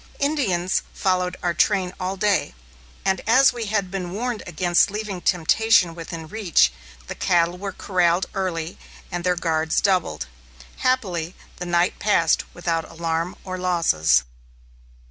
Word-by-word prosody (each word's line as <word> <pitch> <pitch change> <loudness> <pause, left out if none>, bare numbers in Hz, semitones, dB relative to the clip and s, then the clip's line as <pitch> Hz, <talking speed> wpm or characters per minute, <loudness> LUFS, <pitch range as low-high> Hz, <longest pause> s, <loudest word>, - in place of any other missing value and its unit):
Indians 225 - 0 0.2
had - - -17
followed 180 -1 0
our 175 -1 +1
train 185 -1 +1
all 185 +1 -3
day, 200 - +1 0.5
and 190 -1 +1
as 255 +3 +6
we 235 -3 -4
had 200 -3 -1
been 185 -3 -4
warned 240 +2 -3
against 175 +2 +2
leaving 205 -3 -5
temptation 180 +2 +3
within 165 -1 -7
reach, 170 - +2 0.3
the - - -5
cattle 175 -1 +1
were 195 +2 -5
corralled 180 -1 +1
early 180 -4 -3 0.3
and 175 -1 -3
their 180 0 +2
guards 160 -2 0
doubled. 190 -3 0 0.5
Happily, 190 -10 -1 0.2
the 180 - -5
night 175 +1 +1
passed 170 -6 +2
without 165 -2 -2
alarm 165 +1 -2
or 185 -1 -5
losses. 80 - +3
180 Hz, 140 wpm, -23 LUFS, 170-200 Hz, 0.5 s, as